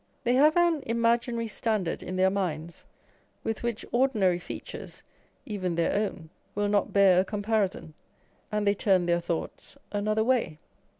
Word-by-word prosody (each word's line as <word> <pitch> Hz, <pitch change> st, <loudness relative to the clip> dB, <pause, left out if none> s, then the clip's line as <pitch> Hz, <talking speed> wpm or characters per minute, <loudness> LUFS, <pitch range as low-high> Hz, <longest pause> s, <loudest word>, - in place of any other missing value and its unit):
They 245 Hz, 0 st, +2 dB
have 300 Hz, +5 st, +5 dB
an 340 Hz, -3 st, +3 dB
imaginary 235 Hz, 0 st, +1 dB
standard 215 Hz, -5 st, -1 dB
in 185 Hz, -, -5 dB
their 190 Hz, +1 st, +3 dB
minds, 170 Hz, -4 st, -3 dB, 0.6 s
with 225 Hz, -1 st, -3 dB
which 235 Hz, -2 st, -3 dB
ordinary 220 Hz, -9 st, +2 dB
features -, -, -8 dB, 0.4 s
(even 185 Hz, -5 st, -3 dB
their 170 Hz, 0 st, +1 dB
own) 195 Hz, -6 st, -2 dB, 0.2 s
will 205 Hz, 0 st, 0 dB
not 205 Hz, -1 st, +1 dB
bear 195 Hz, -2 st, +5 dB
a -, -, +4 dB
comparison, 200 Hz, -5 st, -1 dB, 0.6 s
and 210 Hz, 0 st, 0 dB
they 200 Hz, -, +4 dB
turn 190 Hz, -3 st, +2 dB
their 170 Hz, 0 st, +1 dB
thoughts 170 Hz, +10 st, -5 dB, 0.2 s
another 215 Hz, +1 st, +1 dB
way. 235 Hz, -10 st, +1 dB
205 Hz, 145 wpm, -27 LUFS, 185-230 Hz, 0.6 s, have